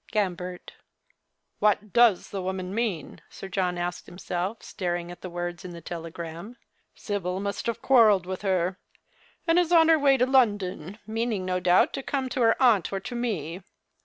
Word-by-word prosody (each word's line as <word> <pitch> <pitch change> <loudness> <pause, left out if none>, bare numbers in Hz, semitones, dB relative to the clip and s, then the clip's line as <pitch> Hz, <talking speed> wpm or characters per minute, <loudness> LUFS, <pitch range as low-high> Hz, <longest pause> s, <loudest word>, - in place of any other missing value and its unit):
" - - -22
Gambert." 180 -4 -3 0.4
" - - -54 0.3
What 210 -1 +1
does 235 -6 +4
the 195 - -3
woman 185 0 -4
mean? 210 -9 -3
" - - -33
Sir 195 - -9
John 185 -2 -1
asked 175 0 -4
himself, 180 +3 -4
staring 175 -2 -3
at 175 - -11
the 185 - -6
words 175 +1 -5
in 180 -1 -8
the 170 - -8
telegram. 170 +5 -7 0.2
" - - -45
Sibyl 190 -3 -3
must 200 +2 -3
have 235 - -3
quarrelled 215 -8 +5
with 185 0 -5
her, 185 -2 0 0.7
and 335 +1 +4
is 350 -1 +1
on 325 -2 +6
her 320 -1 +6
way 275 -1 +4
to 250 - +3
London, 205 - +1
meaning 220 -3 -2
no 185 0 0
doubt 180 0 +3
to - - -3
come 265 -1 -2
to 255 - -2
her 225 -1 +4
aunt 230 -8 +4
or 195 - -2
to 245 - -7
me. 190 -8 -3
195 Hz, 190 wpm, -26 LUFS, 180-230 Hz, 0.7 s, on